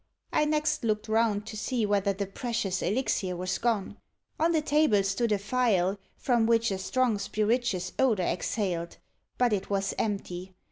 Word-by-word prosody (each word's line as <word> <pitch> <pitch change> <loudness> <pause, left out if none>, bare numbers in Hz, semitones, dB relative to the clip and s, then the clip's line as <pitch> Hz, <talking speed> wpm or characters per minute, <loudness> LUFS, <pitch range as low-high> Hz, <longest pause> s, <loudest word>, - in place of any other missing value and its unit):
I 300 - +3
next 300 -1 0
looked 215 -1 0
round 220 -2 +1
to 220 - -7
see 230 +1 -1
whether 200 -1 +2
the 200 +1 -3
precious 195 -2 -2
elixir 195 -3 0
was 185 +1 -2
gone. 220 -4 -1 0.4
On 325 +2 +3
the 325 - +3
table 295 -10 +3
stood 205 +4 0
a 210 - +3
phial, 200 -3 +1 0.2
from 235 -3 +2
which 230 -1 +3
a 190 - -2
strong 240 +1 +1
spirituous 210 -3 0
odour 220 -9 +3
exhaled; 175 -3 -2 0.4
but 245 -3 +3
it 195 - -2
was 195 -1 0
empty. 190 -3 -3
210 Hz, 160 wpm, -28 LUFS, 195-240 Hz, 0.4 s, I